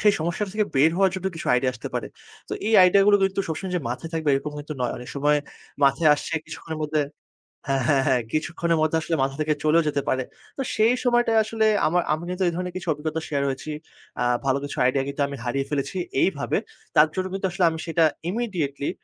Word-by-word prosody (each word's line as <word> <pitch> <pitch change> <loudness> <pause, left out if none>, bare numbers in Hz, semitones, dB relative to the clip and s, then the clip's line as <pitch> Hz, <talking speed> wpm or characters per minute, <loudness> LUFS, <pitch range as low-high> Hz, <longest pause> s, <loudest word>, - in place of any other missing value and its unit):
সেই 210 -1 +5
সমস্যাটা 175 +5 -2
থেকে 215 -1 +2
বের 150 +4 +5
হওয়ার 190 -1 +3
জন্য 190 0 -3
কিছু 165 - -7
আইডিয়া 130 +1 +1
আসতে 120 - -7
পারে। - - -2 0.4
তো - - -6
এই 220 - +2
আইডিয়াগুলো 200 +3 +6
কিন্তু 195 0 +1
সবসময় 180 +4 -4
যে - - -1
মাথায় 125 +7 -5
থাকবে 160 -2 -1
এরকম 140 +2 -2
কিন্তু 150 +1 -6
নয়। 125 - 0
অনেক 125 0 -9
সময় 145 +1 +2 0.5
মাথায় 140 +3 +4
আসছে 150 - -6
কিছুক্ষণের 160 -1 -7
মধ্যে 150 0 +1 0.7
হ্যাঁ, 135 -1 +1
হ্যাঁ, 140 -3 +3
হ্যাঁ, 130 -3 +3
কিছুক্ষণের 165 +1 0
মধ্যে 155 +1 +2
আসলে 165 - -1
মাথা 135 0 -1
থেকে 155 0 +2
চলেও 155 +2 +4
যেতে 145 -1 0
পারে। 130 0 +1 0.3
তো 270 - -2
সেই 225 +3 +4
সময়টায় 240 -2 +3
আসলে 220 0 0 0.2
আমার 175 +3 +2
আমি 155 +2 -3
কিন্তু 180 +1 -2
এই 170 - 0
ধরনের 180 0 -4
কিছু 185 - -6
অভিজ্ঞতা 155 +2 -4
শেয়ার 140 -2 -1
হয়েছি। 135 +3 -5 0.5
আ - - +2 0.2
ভালো 135 0 +2
কিছু 145 - -6
আইডিয়া 135 +1 +2
কিন্তু 140 +1 -3
আমি 140 - -6
হারিয়ে 135 +3 -1
ফেলেছি 145 +6 -2 0.2
এইভাবে। 150 -7 +1 0.4
তার 150 - +7
জন্য 185 0 -1
কিন্তু 195 0 -1
আসলে 190 +1 -1
আমি 160 0 -5
সেটা 165 0 +2 0.3
ইমিডিয়েটলি 180 -11 -2
160 Hz, 210 wpm, -24 LUFS, 140-185 Hz, 0.7 s, তার